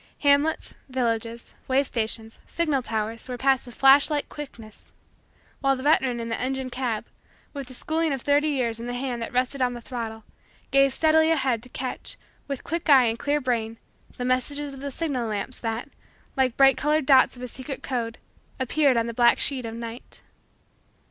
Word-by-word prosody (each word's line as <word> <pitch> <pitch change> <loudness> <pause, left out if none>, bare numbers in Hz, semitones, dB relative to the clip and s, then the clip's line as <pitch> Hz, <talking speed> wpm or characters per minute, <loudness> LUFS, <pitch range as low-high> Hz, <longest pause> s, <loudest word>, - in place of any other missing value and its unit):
Hamlets, 285 +2 +2 0.2
villages, 230 -2 -2
way 270 +1 +3
stations, 225 -3 -3
signal 305 -6 0
towers, 225 +1 -4
were 250 - -4
passed 265 0 +2
with 240 - -10
flash 275 +2 +6
like 295 -2 -1
quickness; 235 -7 -10 0.7
while 275 -1 +2
the 260 - -7
veteran 265 -5 +3
in 230 - -4
the 230 - -2
engine 260 0 -2
cab, 240 -4 -2 0.5
with 280 -3 -6
the 255 - -9
schooling 320 +4 -1
of 270 -3 -3
thirty 290 +1 +3
years 240 -5 0
in 235 - -6
the 245 - -3
hand 245 -2 -3
that 230 - -4
rested 255 +2 0
on 250 -1 +2
the - - -6
throttle, 230 -2 -6 0.5
gazed 275 -1 +4
steadily 315 0 +4
ahead 265 -7 +1
to 250 - -9
catch, 255 +1 -6 0.3
with 275 -2 -4
quick 335 0 -3
eye 265 -3 +8
and 230 0 -1
clear 290 +1 +1
brain, 230 -4 -2 0.4
the 245 - -3
messages 280 +3 -1
of 270 - -10
the 280 - -3
signal 270 -5 -2
lamps 215 +4 -4
that, 225 +3 -3 0.5
like 260 -2 +1
bright 270 -1 +6
colored 300 0 +1
dots 260 -1 +5
of 250 - -10
a - - -3
secret 260 +3 -7
code, 235 -3 -3 0.4
appeared 265 0 +2
on 230 - +2
the 235 - -4
black 235 0 +5
sheet 260 -4 0
of 225 - -6
night. 230 +1 -9
255 Hz, 190 wpm, -25 LUFS, 235-280 Hz, 0.7 s, eye